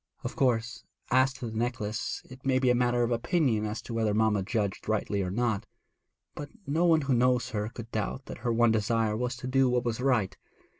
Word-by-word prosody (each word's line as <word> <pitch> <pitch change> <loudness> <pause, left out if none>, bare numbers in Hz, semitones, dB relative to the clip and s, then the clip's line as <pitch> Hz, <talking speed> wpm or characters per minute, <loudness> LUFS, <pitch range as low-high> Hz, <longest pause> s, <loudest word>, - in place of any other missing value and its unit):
'Of - - -4
course, 120 -3 0 0.3
as 130 +2 +4
to 135 - -7
the - - -8
necklace, 115 -2 -2
it 130 +1 -13
may 130 -1 +2
be 130 -1 +3
a - - +4
matter 120 0 +2
of 120 - 0
opinion 120 - +1
as 110 +3 -5
to 115 - -7
whether 110 -2 +1
mamma 110 -2 +2
judged 105 0 -2
rightly 105 -2 0
or 90 - -2
not; 110 0 -1 0.7
but 145 -1 -7 0.2
no 160 +5 +1
one 165 -2 +4
who 135 -2 0
knows 125 0 +2
her 105 0 -2
could 115 -1 -9
doubt 110 +5 -3
that - - -8
her 120 - -1
one 115 0 +4
desire 110 0 +1
was 125 +2 -2
to 125 - -9
do 130 0 +3
what 125 0 0
was 115 -1 -1
right. 115 -8 +1
120 Hz, 215 wpm, -29 LUFS, 110-125 Hz, 0.7 s, as